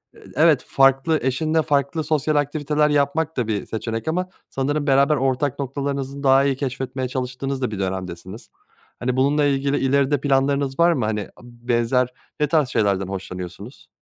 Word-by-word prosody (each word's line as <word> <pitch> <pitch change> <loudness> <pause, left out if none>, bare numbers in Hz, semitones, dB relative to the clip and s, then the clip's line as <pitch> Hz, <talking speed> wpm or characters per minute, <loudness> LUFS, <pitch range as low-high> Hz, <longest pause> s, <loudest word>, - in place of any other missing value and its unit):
eee, - - -17
evet 155 -1 +4
farklı 135 +4 +3
eşinle 155 +5 +1
farklı 145 +1 0
sosyal 155 0 0
aktiviteler 150 +1 +1
yapmak 150 +2 0
da 120 -3 0
bir 105 -2 -2
seçenek 115 +3 -4
ama 180 +3 -1 0.2
sanırım 145 +2 -1
beraber 140 +2 +4
ortak 135 +1 0
noktalarınızı 140 0 -3
daha 135 0 +5
iyi 135 -1 +1
keşfetmeye 130 -1 -3
çalıştığınız 130 +1 -4
da 125 - -1
bir 100 - -5
dönemdesiniz. 95 +1 -5 0.5
Hani, 125 +1 -1
bununla 145 +2 +3
ilgili 140 0 +1
ileride 140 +1 +2
planlarınız 140 0 +1
var 170 0 +5
mı? 125 -7 -1
Hani, 105 -1 -1 0.2
b 120 0 -16
benzer 120 +2 +2 0.3
ne 150 - +2
tarz 150 -4 +2
şeylerden 100 -5 +1
hoşlanıyorsunuz? 95 +4 -8
135 Hz, 160 wpm, -22 LUFS, 125-145 Hz, 0.5 s, daha